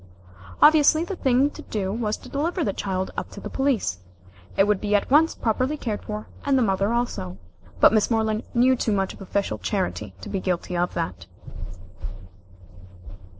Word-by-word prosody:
Obviously 310 +1 +6
the 370 +3 -4
thing 270 -2 +2
to - - -10
do 195 -3 -3
was 215 -2 -1
to - - -14
deliver 330 +5 -1
the 200 - -1
child 190 -1 -3
up - - -4
to - - -10
the - - -7
police. 265 - 0 0.6
It 195 - +5
would 210 -2 +1
be 210 0 +1
at 205 - 0
once 315 +3 +5
properly 255 +6 0
cared 220 -7 -3
for, 210 0 -5 0.2
and 280 -1 +2
the 255 - +3
mother 195 0 +1
also. 235 - -2 0.4
But - - +7
Miss 215 -2 +3
Moreland 220 -1 +1
knew 255 +2 +5
too 225 -3 0
much 195 -1 0
of - - -15
official 195 - -2
charity 90 +1 -3
to - - -8
be 195 - -2
guilty 180 -1 -2
of 175 0 -1
that. 90 - -4
215 Hz, 180 wpm, -24 LUFS, 190-260 Hz, 0.6 s, But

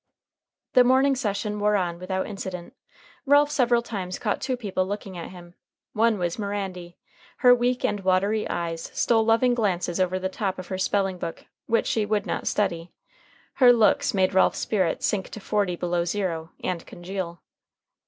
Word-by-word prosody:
The 250 - +7
morning 265 +2 +4
session 210 -3 -2
wore 210 0 +2
on 175 -3 -1
without 190 +1 -2
incident. 190 -1 -7 0.5
Ralph 290 +1 +5
several 240 -4 +2
times 190 -6 -5
caught - - -2
two 255 -2 -1
people 190 -5 -2
looking 200 -1 -5
at 170 - -6
him. 175 -1 -13 0.4
One 225 0 +2
was 175 +1 -2
Mirandy. 190 -4 -4 0.4
Her 250 -1 +7
weak 245 +1 +1
and 205 - 0
watery 195 +3 +1
eyes 165 -1 -3
stole 225 -2 +3
loving 230 +3 +3
glances 190 -6 -1
over 185 0 +1
the 185 0 -2
top 190 0 -3
of 185 - -8
her 190 -1 -3
spelling 190 -1 0
book, 165 -1 -6 0.2
which 230 0 +2
she 215 -2 0
would 210 -1 0
not - - -3
study. 170 -5 -1 0.7
Her 250 -1 +9
looks 225 -4 +3
made 190 0 +2
Ralph's 190 - +3
spirits 190 -6 0
sink 195 -3 -1
to - - -8
forty 200 -3 0
below 175 0 -1
zero, 170 -3 -2
and 180 -2 -2
congeal. 175 -1 -6
195 Hz, 170 wpm, -25 LUFS, 180-220 Hz, 0.7 s, Her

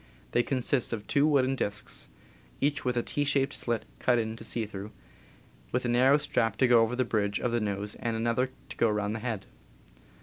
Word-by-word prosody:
They 120 - +3
consist 125 -1 0
of 105 -2 -4
two 140 +7 +3
wooden 135 -3 +3
disks, 105 -4 -3 0.5
each 145 +1 0
with 125 -1 0
a 120 - +1
T 145 - -1
shaped 140 -1 +1
slit 120 -2 -2
cut 125 -1 +3
in 110 -1 0
it - - -10
to - - -9
see 110 0 -2
through, 100 0 -7 0.8
with 125 +1 0
a - - +1
narrow 130 +4 +5
strap 115 -6 0
to 130 - +4
go 120 -1 +6
over 115 +2 +1
the 130 0 +1
bridge 105 -3 0
of 125 - -1
the 120 -1 +1
nose 105 0 -2
and 115 -1 -3
another 115 +3 +1 0.2
to - - -8
go 115 - +3
around 105 0 0
the 115 - -3
head. 110 -4 -3
120 Hz, 215 wpm, -29 LUFS, 110-130 Hz, 0.8 s, go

